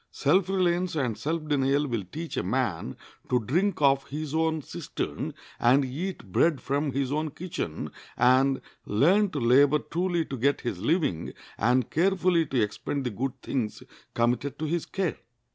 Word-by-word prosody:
Self 180 +6 +2
reliance 180 -2 +1
and 125 -7 0
self 155 +4 -3
denial 140 0 +2
will 115 -7 -2
teach 165 +1 -5
a - - 0
man - - -2 0.3
to 125 - +3
drink 165 - 0
of 135 -1 +4
his 150 0 -5
own 160 -1 +1
cistern, - - -5 0.2
and 130 +3 +4
eat 145 - -5
bread 155 - +3
from 140 +1 -1
his 135 0 -1
own 155 +1 0
kitchen, 150 - -5 0.3
and 130 +2 +4 0.3
learn 185 - +4
to 150 - -3
labor 135 +5 +5
truly 170 +2 -1
to 135 - -5
get 140 +4 +1
his 110 -7 -3
living, 145 - 0 0.2
and 125 +2 +1
carefully 180 -1 +2
to 130 - 0
expend 115 +6 -1
the 125 - -2
good 130 +5 -3
things 115 -6 -3 0.3
committed 120 +4 0
to 160 - -3
his 170 +2 -1
care. 190 -5 -2
145 Hz, 160 wpm, -27 LUFS, 130-165 Hz, 0.3 s, labor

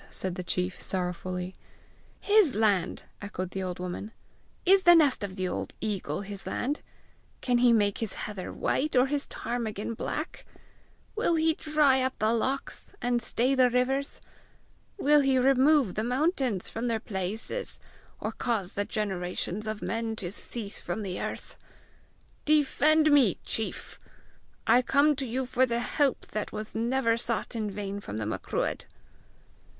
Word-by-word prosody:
said 185 -1 -4
the 180 - -4
chief 180 +1 -2
sorrowfully. 180 0 -2 0.7
"His 410 -9 +4
land!" 205 -4 +1 0.2
echoed 185 -3 -5
the 195 - -3
old 180 -1 -3
woman. 180 +4 -5 0.5
"Is 385 +2 +6
the 345 -1 +8
nest 290 -9 +4
of 190 -2 -4
the 185 -1 -1
old - - -4
eagle 195 -7 -2
his 200 -1 -6
land? 285 +4 -2 0.6
Can 245 -1 +2
he 245 0 +6
make 205 -3 +3
his 225 -4 -3
heather 205 -3 -5
white 305 +1 -1
or 250 0 +6
his 285 +1 0
ptarmigan 230 -2 -3
black? 305 +7 -4 0.7
Will 430 -6 +2
he 320 0 +3
dry 300 -4 +3
up 260 0 -1
the 215 +1 +2
lochs, 265 +4 -2
and 240 0 0
stay 250 +3 +1
the 255 -2 +5
rivers? 260 +3 0 0.8
Will 295 -5 +5
he 270 -2 +3
remove 270 - +4
the 215 - -1
mountains 255 - 0
from 230 +2 -3
their 230 -2 0
places, 210 - -4 0.4
or - - -3
cause 220 -7 -2
the 205 - -1
generations 195 0 -2
of 215 -1 -4
men 225 -1 -2
to 185 -5 -4
cease 210 0 -5
from 215 - -3
the 185 -2 -4
earth? - - -6 0.9
Defend 305 +1 +4
me, 265 - +5
chief! 220 - -3 0.7
I 250 - +6
come 285 +4 +3
to 270 - -2
you 255 +3 -1
for 255 +1 +2
the 235 -1 0
help 270 +3 0
that 215 - -3
was 215 0 -5
never 230 0 +1
sought 235 0 -2
in 215 -2 -1
vain 200 0 -4
from 110 - -6
the 110 - -2
Macruadh!" 110 - -2
230 Hz, 155 wpm, -28 LUFS, 200-270 Hz, 0.9 s, the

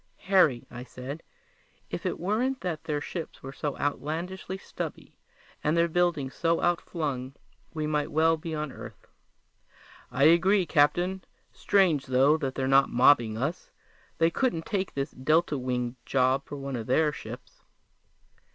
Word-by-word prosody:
"Harry," 185 -11 +3
I 120 0 -7
said, 130 +5 -8 0.7
"if - - -3
it - - -3
weren't 235 +9 0
that 170 -4 -4
their 150 -2 -2
ships 165 +2 -6
are 135 +1 -7
so 145 0 -4
outlandishly 170 +6 -3
stubby - - -7 0.5
and 155 +3 +1
their 170 0 +4
buildings 170 -6 0
so 165 0 +1
outflung, 145 -7 -2 0.4
we 155 -1 -1
might 150 -1 0
well 160 +2 +3
be 160 0 -5
on 150 -2 -3
Earth!" - - -11 1.0
"I 125 +2 0
agree, 180 +5 +5
Captain. 175 +5 +2 0.3
Strange, 170 -8 +2
though, 130 +4 +4
that 135 -4 -3
they're 130 -1 -1
not 135 +1 +5
mobbing 120 -3 +4
us. 140 +9 -3 0.5
They 165 0 +3
couldn't 170 -8 0
take 195 -3 -2
this 140 0 -2
delta 155 +4 +1
winged 125 -1 -2
job 130 +2 +1
for - - -6
one 140 -1 -5
of 115 -2 -5
their 150 +4 +3
ships!" - - -10
150 Hz, 150 wpm, -28 LUFS, 135-170 Hz, 1.0 s, agree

